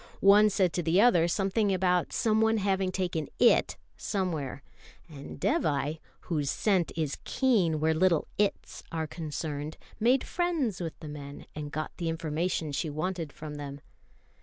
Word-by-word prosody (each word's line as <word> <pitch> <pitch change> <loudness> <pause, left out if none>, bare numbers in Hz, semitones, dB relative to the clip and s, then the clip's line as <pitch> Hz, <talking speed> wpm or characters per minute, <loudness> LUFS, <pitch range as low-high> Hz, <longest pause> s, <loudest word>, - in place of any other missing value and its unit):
One 205 +2 +7
said 185 -3 +1
to 175 - 0
the 170 +3 +2
other 200 -7 +5
something 195 +4 +1
about 180 -1 +1
someone 220 0 +2
having 190 -2 0
taken 175 -5 -2
"It" 240 - +4 0.2
somewhere; 160 - -3 0.4
and 145 -4 -10
Dévai, 155 - 0 0.2
whose 150 -5 -2
scent 190 -2 +1
is 155 -4 -2
keen 195 - +2
where 160 +1 +2
little 170 -1 +2
"Its" 205 -1 -1
are 160 -1 -2
concerned, 155 -1 -5 0.2
made 245 +4 +3
friends 320 - -1
with 165 -2 -5
the 155 - -7
men, 145 -1 -8
and 150 -1 -6
got 155 +1 -3
the 170 -2 -2
information 160 0 -2
she 145 +3 -2
wanted 160 +1 -3
from 150 -1 -8
them. 140 -1 -7
170 Hz, 150 wpm, -29 LUFS, 155-195 Hz, 0.4 s, One